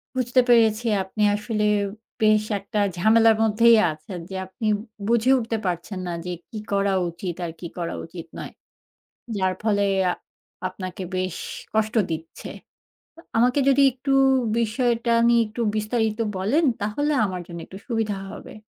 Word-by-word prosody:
বুঝতে 255 0 +3
পেরেছি। 230 -1 +4 0.2
আপনি 200 +3 -3
আসলে 210 +1 -2 0.6
বেশ 215 -1 +4 0.2
একটা 200 +2 -3 0.2
ঝামেলার 225 +4 +5
মধ্যেই 230 +2 +5
আছেন, 155 +4 -8
যে 190 - -6
আপনি 190 +4 -7 0.4
বুঝে 235 +2 +3
উঠতে 225 -1 -2
পারছেন 185 +2 -3
না - - -2
যে 180 - -3 0.2
কি 220 - -7
করা 200 0 +2 0.2
উচিত 170 +1 -5
আর 165 - -4
কি - - -8
করা 170 -1 -3
উচিত 165 0 -9
নয়। - - -7 0.9
যার 190 -1 +1
ফলে 210 -2 +2 0.2
এ - - +3
আ - - +1 0.6
আপনাকে 185 0 -7
বেশ 185 -1 -2 0.4
কষ্ট 220 +1 +1 0.2
দিচ্ছে। 160 0 -6 0.9
আমাকে 250 +4 +3
যদি 275 +1 +4
একটু 260 +2 -4 0.5
বিষয়টা 235 +1 +1
নিয়ে 235 0 +5
একটু 225 +3 -5
বিস্তারিত 215 0 -1 0.2
বলেন 220 - +1 0.2
তাহলে 250 +9 -1
আমার 185 -2 -4
জন্য 170 -1 -7
একটু 190 - -10
সুবিধা 225 -4 -1
হবে। - - -10
215 Hz, 150 wpm, -24 LUFS, 185-235 Hz, 0.9 s, ঝামেলার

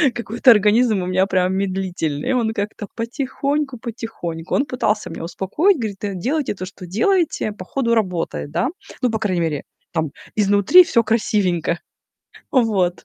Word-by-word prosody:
Какой-то 235 +2 +1
организм 215 -1 +4
у - - -3
меня 185 +1 +2
прям 185 -1 +1
медлительный. 190 - -2
И - - +3
он 230 -3 +1
как-то 205 0 -4
потихоньку-потихоньку". 235 - -3
Он 275 - +2
пытался 220 -5 -1
меня - - -7
успокоить, 300 - +1
говорит: 215 -6 -4
"Да 205 -1 -3
делайте 265 - -1
то, 185 -1 -5
что 185 -1 -10
делаете. 285 - +1
По 185 -3 -9
ходу 235 -1 0
работает, 180 -8 -1
да?" 175 +9 0 0.3
Ну, 245 - +3
по 220 - -1
крайней 185 -5 0
мере, 155 -4 -1 0.3
там 160 -3 -1 0.2
изнутри 205 - +6
всё 235 -9 +2
красивенько. 185 -7 0 0.7
Вот. 200 - +1
210 Hz, 150 wpm, -20 LUFS, 185-240 Hz, 0.7 s, изнутри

